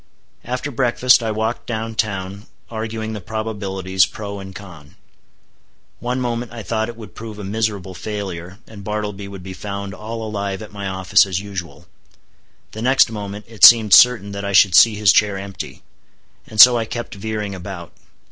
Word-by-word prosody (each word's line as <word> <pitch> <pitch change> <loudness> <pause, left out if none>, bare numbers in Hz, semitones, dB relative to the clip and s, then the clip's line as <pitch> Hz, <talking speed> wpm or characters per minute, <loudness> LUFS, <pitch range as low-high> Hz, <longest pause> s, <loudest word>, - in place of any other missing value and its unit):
After 125 +4 -4
breakfast, 125 0 +3
I 115 - -2
walked 110 +2 -3
down 115 -1 -4
town, 100 -2 -3 0.2
arguing 110 0 -4
the 105 - -6
probabilities 95 -3 -1
pro 100 -1 -7
and 95 0 -10
con. 85 -8 -12 1.0
One 125 +1 -2
moment 120 -1 -3
I 115 -2 -8
thought 110 +1 -2
it 120 - -9
would 110 -2 -11
prove 110 -2 -9
a 105 - -8
miserable 100 -2 -3
failure, 95 -3 -6
and 105 -3 -12
Bartleby 105 -1 -4
would 100 -2 -10
be 95 0 -7
found 100 0 -6
all 110 +2 -6
alive 100 -1 -4
at 105 - -12
my 100 -1 -5
office 95 +1 +3
as 90 -1 -2
usual; 95 -4 -8 0.9
the 110 - -8
next 130 -1 +4
moment 105 -1 -7
it 115 -4 -10
seemed 110 -4 +9
certain 115 -5 +6
that 100 0 -6
I 100 0 -3
should 95 -1 +6
see 110 +5 +7
his 105 -4 +4
chair 100 -2 +2
empty. 95 -2 -8 0.6
And 110 - -8
so 120 +1 +9
I 115 - -2
kept 120 +1 -6
veering 105 0 -4
about. 90 -3 -8
105 Hz, 175 wpm, -20 LUFS, 95-110 Hz, 1.0 s, seemed